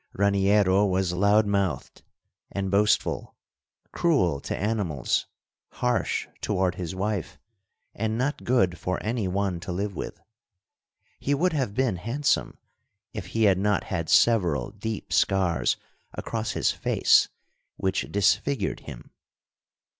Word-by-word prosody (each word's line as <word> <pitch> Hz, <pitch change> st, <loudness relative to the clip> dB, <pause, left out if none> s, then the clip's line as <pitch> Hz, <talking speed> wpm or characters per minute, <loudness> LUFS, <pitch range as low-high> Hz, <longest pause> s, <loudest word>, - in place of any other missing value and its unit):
Raniero 100 Hz, 0 st, +3 dB
was 95 Hz, -2 st, +1 dB
loud 100 Hz, +4 st, +4 dB
mouthed 100 Hz, -3 st, -2 dB, 0.5 s
and 95 Hz, -1 st, -3 dB
boastful; 105 Hz, +1 st, +1 dB, 0.6 s
cruel 90 Hz, -, +2 dB
to -, -, -4 dB
animals, 100 Hz, -, -1 dB, 0.5 s
harsh 125 Hz, -1 st, 0 dB
toward 90 Hz, -1 st, 0 dB
his 90 Hz, 0 st, -5 dB
wife, 100 Hz, -2 st, -3 dB, 0.6 s
and 110 Hz, +1 st, -2 dB
not 135 Hz, +5 st, -1 dB
good 95 Hz, -9 st, +2 dB
for 90 Hz, +1 st, -2 dB
any 110 Hz, -2 st, -1 dB
one 95 Hz, -1 st, -1 dB
to 90 Hz, -, -6 dB
live 100 Hz, +2 st, -3 dB
with. -, -, -6 dB, 1.0 s
He 145 Hz, -, 0 dB
would 175 Hz, +4 st, +1 dB
have 130 Hz, -9 st, -1 dB
been 125 Hz, -7 st, +1 dB
handsome 120 Hz, +10 st, -1 dB, 0.6 s
if 105 Hz, -5 st, -6 dB
he 115 Hz, +5 st, 0 dB
had 95 Hz, -3 st, +4 dB
not 105 Hz, 0 st, +1 dB
had 85 Hz, -4 st, -3 dB
several 95 Hz, -8 st, +3 dB
deep 105 Hz, +1 st, -5 dB
scars 90 Hz, -10 st, +2 dB, 0.4 s
across -, -, -3 dB
his -, -, +1 dB
face -, -, +3 dB, 0.5 s
which 95 Hz, 0 st, -1 dB
disfigured 100 Hz, +7 st, +1 dB
him. -, -, -11 dB
100 Hz, 125 wpm, -26 LUFS, 95-110 Hz, 1.0 s, loud